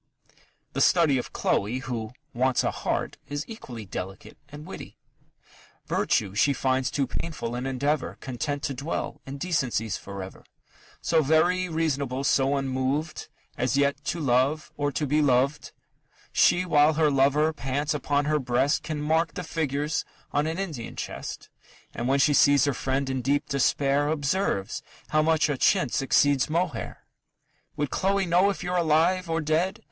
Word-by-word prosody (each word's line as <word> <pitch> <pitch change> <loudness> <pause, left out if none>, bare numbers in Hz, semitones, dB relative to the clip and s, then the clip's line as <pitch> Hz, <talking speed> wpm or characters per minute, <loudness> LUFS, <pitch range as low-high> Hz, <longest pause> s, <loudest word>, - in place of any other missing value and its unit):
The - - -1
study 155 -7 +4
of - - -6
Chloe, 105 +6 0
who 120 -4 -4 0.2
"wants 130 +1 +2
a - - +1
heart," - - -3
is 145 +1 -3
equally 125 - -8
delicate 95 +1 -7
and 150 +1 -10
witty: - - -9 0.9
Virtue 100 -3 0
she 125 +7 +3
finds 130 0 0
too 140 - 0
painful 130 -3 -4
an 125 +2 -3
endeavour, 140 +3 -1
Content 140 +2 -4
to 140 - -1
dwell 140 +5 -4
in 135 +1 -6
decencies 130 - -1
for 100 -1 -7
ever 95 - -11 0.6
So 165 -1 +3
very 175 +5 +2
reasonable, 140 -5 -1
so 140 0 +2
unmoved, 135 +3 -2 0.3
As 125 +2 +1
never - - +2
yet 140 +1 0
to 170 - -2
love, 140 +2 +1
or 145 0 -1
to 150 - -1
be 150 +2 +2
loved. 140 +1 +1 0.6
She, 180 +1 +4
while 155 -2 +4
her 155 -1 +3
lover 140 +3 +3
pants 145 +1 -2
upon 145 0 0
her 150 0 +1
breast, 130 +3 +1
Can 155 -2 -4
mark 160 +2 +1
the 180 - -4
figures 150 -2 -1 0.3
on 145 +2 +1
an 160 +2 -2
Indian 160 -12 -5
chest; - - -6 0.5
And 120 - -3
when 135 +1 +3
she 145 +2 +4
sees 140 0 +5
her 140 - +1
friend 135 +2 -1
in 130 -1 -2
deep 145 +4 0
despair, 140 +1 +2
Observes 150 - -1 0.3
how 155 - +3
much 160 0 +3
a 145 -4 -2
chintz 185 -6 +2
exceeds 140 0 +3
mohair!... 165 -6 -2 0.7
Would 145 -3 -2
Chloe 195 0 +1
know 180 +3 +4
if 200 - -3
you're 180 0 -2
alive 170 +2 +2
or 165 0 0
dead? 160 +5 0
145 Hz, 160 wpm, -26 LUFS, 130-160 Hz, 0.9 s, sees